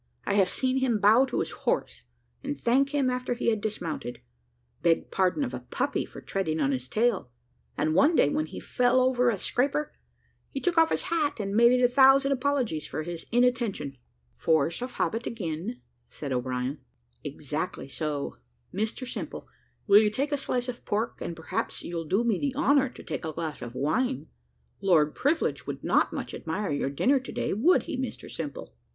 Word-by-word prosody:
I -, -, 0 dB
have 195 Hz, -2 st, +4 dB
seen 260 Hz, +4 st, 0 dB
him 260 Hz, -4 st, +2 dB
bow 220 Hz, +6 st, +6 dB
to -, -, -1 dB
his -, -, -3 dB
horse, -, -, -2 dB, 0.4 s
and 145 Hz, -, -4 dB
thank 265 Hz, -, +3 dB
him 280 Hz, -2 st, +1 dB
after 250 Hz, -1 st, -1 dB
he 235 Hz, -, +1 dB
had 215 Hz, -2 st, -1 dB
dismounted 170 Hz, -, -4 dB, 0.6 s
beg 170 Hz, -1 st, +2 dB
pardon 190 Hz, +9 st, +1 dB
of 255 Hz, -, -3 dB
a -, -, -3 dB
puppy -, -, -2 dB
for -, -, -11 dB
treading 160 Hz, -5 st, -2 dB
on 140 Hz, -2 st, +2 dB
his 130 Hz, -1 st, -3 dB
tail; 215 Hz, -, +1 dB, 0.5 s
and 155 Hz, +2 st, +1 dB
one 300 Hz, -, +5 dB
day, -, -, +5 dB
when 155 Hz, +2 st, 0 dB
he -, -, -8 dB
fell 250 Hz, +1 st, +2 dB
over 250 Hz, -1 st, +3 dB
a 220 Hz, -, 0 dB
scraper, 280 Hz, +9 st, 0 dB, 0.6 s
he 275 Hz, -, -4 dB
took 355 Hz, +3 st, 0 dB
off 325 Hz, -1 st, +5 dB
his -, -, 0 dB
hat, 310 Hz, -6 st, 0 dB
and 200 Hz, -1 st, -2 dB
made 235 Hz, +2 st, +7 dB
it 250 Hz, 0 st, +3 dB
a -, -, +7 dB
thousand 270 Hz, +2 st, +5 dB
apologies 255 Hz, -, 0 dB
for 155 Hz, -, -4 dB
his 170 Hz, 0 st, -6 dB
inattention." 235 Hz, -, +1 dB, 0.4 s
"Force 160 Hz, +4 st, +1 dB
of 250 Hz, +1 st, -4 dB
habit 230 Hz, +2 st, -1 dB
again," 195 Hz, +2 st, -4 dB, 0.3 s
said 140 Hz, -3 st, -6 dB
O'Brien. 125 Hz, +2 st, -2 dB, 0.4 s
"Exactly -, -, -4 dB
so. 145 Hz, 0 st, -3 dB, 0.4 s
Mr 220 Hz, +5 st, -2 dB
Simple, -, -, -6 dB, 0.4 s
will 205 Hz, 0 st, +7 dB
you 215 Hz, -, +3 dB
take 275 Hz, +8 st, -2 dB
a -, -, +2 dB
slice 250 Hz, -2 st, -2 dB
of 250 Hz, -1 st, -4 dB
this -, -, -30 dB
pork; 215 Hz, +3 st, -2 dB
and 170 Hz, -, -4 dB
perhaps 165 Hz, -, -3 dB
you'll 170 Hz, -1 st, -4 dB
do 195 Hz, +9 st, +1 dB
me 225 Hz, -5 st, +1 dB
the 275 Hz, -2 st, -1 dB
honour 280 Hz, -3 st, +3 dB
to -, -, -13 dB
take -, -, -5 dB
a 160 Hz, -1 st, -4 dB
glass 160 Hz, -3 st, -4 dB
of 120 Hz, 0 st, -7 dB
wine? 235 Hz, -, 0 dB, 0.6 s
Lord 160 Hz, -6 st, +4 dB
Privilege 310 Hz, +4 st, 0 dB
would -, -, -5 dB
not -, -, +3 dB
much -, -, -5 dB
admire 180 Hz, +3 st, -3 dB
your 145 Hz, -1 st, 0 dB
dinner 260 Hz, -, +2 dB
to 260 Hz, -, -9 dB
day, -, -, -1 dB
would 280 Hz, -, +4 dB
he, 335 Hz, -, -4 dB
Mr 260 Hz, -3 st, -5 dB
Simple?" 150 Hz, -, -6 dB
220 Hz, 195 wpm, -27 LUFS, 160-260 Hz, 0.6 s, made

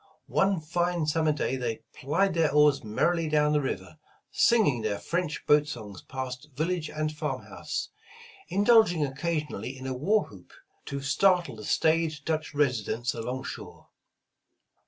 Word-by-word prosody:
One 195 Hz, -3 st, +1 dB
fine 175 Hz, +1 st, 0 dB
summer 155 Hz, 0 st, +2 dB
day 135 Hz, -3 st, -1 dB
they 120 Hz, -3 st, -3 dB
plied 165 Hz, +8 st, 0 dB
their 160 Hz, -3 st, +2 dB
oars 150 Hz, -1 st, +4 dB
merrily 165 Hz, +10 st, 0 dB
down 150 Hz, 0 st, +3 dB
the 150 Hz, -, +3 dB
river, 95 Hz, -, -5 dB, 0.3 s
singing 200 Hz, -, +3 dB
their 105 Hz, -2 st, -1 dB
French 170 Hz, -, -3 dB
boat 150 Hz, 0 st, +4 dB
songs 105 Hz, -9 st, -7 dB
past 130 Hz, +1 st, -6 dB
village 160 Hz, +1 st, -1 dB
and 155 Hz, 0 st, -2 dB
farm -, -, -3 dB
house, -, -, -5 dB, 0.6 s
indulging 200 Hz, -6 st, +4 dB
oc 135 Hz, -, -5 dB
casionally 150 Hz, -7 st, -3 dB
in 130 Hz, -, -9 dB
a 130 Hz, -, -2 dB
war 195 Hz, +12 st, +2 dB
whoop 95 Hz, -4 st, -16 dB, 0.3 s
to 140 Hz, 0 st, -4 dB
startle 175 Hz, -, +2 dB
the 105 Hz, -1 st, -9 dB
staid 160 Hz, +2 st, +2 dB
Dutch 155 Hz, -2 st, -2 dB
residents 125 Hz, -4 st, 0 dB
along 125 Hz, +3 st, -4 dB
shore. -, -, -9 dB
150 Hz, 150 wpm, -28 LUFS, 130-165 Hz, 0.6 s, oars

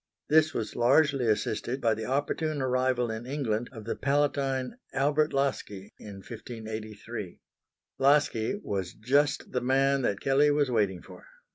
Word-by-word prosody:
This 155 Hz, +1 st, +5 dB
was 110 Hz, -6 st, -4 dB
largely 135 Hz, +1 st, +3 dB
assisted 110 Hz, +4 st, -1 dB
by 115 Hz, -3 st, +2 dB
the 110 Hz, 0 st, -5 dB
opportune 145 Hz, +3 st, -1 dB
arrival 130 Hz, -2 st, +1 dB
in 110 Hz, +2 st, -6 dB
England 120 Hz, -5 st, -2 dB
of 110 Hz, -5 st, -10 dB
the 115 Hz, -, -2 dB
Palatine 140 Hz, -, 0 dB, 0.2 s
Albert 145 Hz, +3 st, +2 dB
Laski 115 Hz, -8 st, -2 dB
in 105 Hz, -2 st, -9 dB
1583. 110 Hz, -3 st, -7 dB, 0.6 s
Laski 140 Hz, -, +2 dB
was 95 Hz, -3 st, -3 dB
just 140 Hz, +6 st, +1 dB
the 125 Hz, -, -1 dB
man 135 Hz, +2 st, +2 dB
that 100 Hz, -5 st, 0 dB
Kelley 140 Hz, +2 st, +3 dB
was 145 Hz, -2 st, +2 dB
waiting 100 Hz, -6 st, 0 dB
for. -, -, -14 dB
130 Hz, 140 wpm, -28 LUFS, 110-140 Hz, 0.6 s, This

